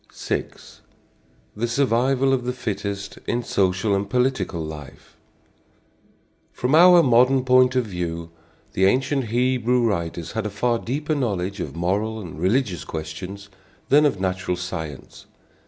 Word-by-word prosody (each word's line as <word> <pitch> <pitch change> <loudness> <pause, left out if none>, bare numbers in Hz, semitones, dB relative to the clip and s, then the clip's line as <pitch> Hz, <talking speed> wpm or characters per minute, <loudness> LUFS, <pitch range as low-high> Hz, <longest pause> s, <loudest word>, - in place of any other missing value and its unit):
VI. - - -2 1.1
THE 120 +3 -1
SURVIVAL 135 +2 +2
OF 125 -2 -1
THE 125 - -1
FITTEST 100 -4 -5
IN 120 +1 -1
SOCIAL 95 0 +1
AND 100 0 -1
POLITICAL 125 -8 0
LIFE. 75 -4 -9 1.4
From 125 +3 -2
our 175 +1 +8
modern 125 +1 +4
point 130 0 +4
of 125 -2 +2
view, 85 -4 -5 0.4
the 95 - +2
ancient 135 +5 +1
Hebrew 125 +1 +1
writers 85 -5 -2
had 110 -2 -2
a - - -4
far 115 +3 0
deeper 150 +7 -2
knowledge 100 -8 -2
of 85 - -5
moral 100 +6 -1
and 85 -6 -9
religious 95 - 0
questions 90 +6 -7 0.4
than 150 +2 +6
of 115 -9 -2
natural 95 -1 -2
science. 80 -5 -7
105 Hz, 135 wpm, -23 LUFS, 90-125 Hz, 1.4 s, our